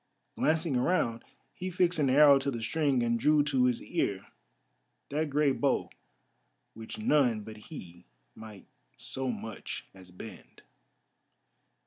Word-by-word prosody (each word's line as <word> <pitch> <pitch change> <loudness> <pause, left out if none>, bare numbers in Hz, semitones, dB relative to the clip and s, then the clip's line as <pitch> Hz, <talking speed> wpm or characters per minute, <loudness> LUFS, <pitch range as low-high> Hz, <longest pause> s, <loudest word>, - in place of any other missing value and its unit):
Glancing 160 -2 +1
around, 125 -4 +1 0.3
he 185 - -5
fixed 180 -2 +1
an 140 -3 +3
arrow 140 +1 +7
to 140 +1 -2
the 120 -4 -4
string 140 0 +1
and 115 0 +1
drew 150 +3 +4
to 135 -3 +2
his 125 -2 0
ear - - -2 0.9
that 155 +1 -1
great 145 -1 +1
bow 140 - +1 0.8
which 110 - -8
none 145 - +2
but 110 +1 -9
he 85 - -10 0.3
might 110 -3 -12 0.3
so 130 -1 -3
much 110 -3 -6
as 95 -1 -14
bend. 90 +1 -12
135 Hz, 130 wpm, -30 LUFS, 115-150 Hz, 0.9 s, arrow